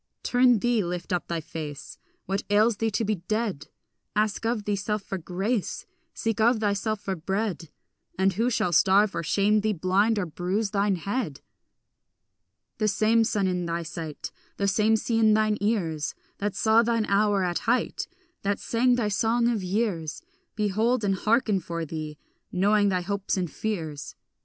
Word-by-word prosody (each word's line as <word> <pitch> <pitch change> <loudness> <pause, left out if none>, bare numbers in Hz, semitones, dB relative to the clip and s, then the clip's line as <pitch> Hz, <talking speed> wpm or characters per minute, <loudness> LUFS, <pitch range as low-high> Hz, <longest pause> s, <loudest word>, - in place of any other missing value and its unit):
Turn 245 -1 +4
thee, 235 0 +1
lift 175 +2 -4
up 180 - -1
thy 170 -1 -2
face; 150 -2 -7 0.3
What 195 +2 -1
ails 210 +2 +4
thee 225 +1 0
to 220 +1 -1
be 210 0 0
dead? 205 -2 -2 0.5
Ask 215 +1 0
of 230 -2 -1
thyself 205 0 -2
for 195 -1 -4
grace, 190 +6 -2 0.3
Seek 225 -2 -1
of 235 +1 +4
thyself 210 0 0
for 195 -2 -2
bread, 190 -1 -3 0.5
And 190 +1 +3
who 230 +6 +1
shall 180 -7 0
starve 195 +4 +4
or - - -1
shame 205 +6 +2
thee, 215 0 +1
blind 195 +5 +2
or 200 - 0
bruise 185 +6 -2
thine 200 -1 +2
head? 190 - -3 1.4
The 215 - +2
same 220 +2 +3
sun 205 -3 0
in 180 -2 -1
thy 170 0 -2
sight, 160 -2 -6 0.3
The 200 - 0
same 215 +2 +3
sea 225 +1 0
in 215 -1 +5
thine 215 -1 +1
ears, 170 -8 -1 0.2
That 205 0 -2
saw 220 +1 +4
thine 230 -1 +1
hour 200 -1 +2
at 175 -1 0
height, 245 - 0 0.3
That 200 0 0
sang 245 +2 +2
thy 235 -3 0
song 230 +3 +2
of 225 -4 0
years, 185 -5 -2 0.3
Behold 220 +3 +1
and 195 -1 +2
hearken 215 +1 +2
for 170 -1 -4
thee, 155 -1 -6 0.3
knowing 205 +2 +3
thy 185 -2 0
hopes 200 +1 -2
and 180 -3 -2
fears. 160 -9 -4
205 Hz, 165 wpm, -26 LUFS, 180-220 Hz, 1.4 s, in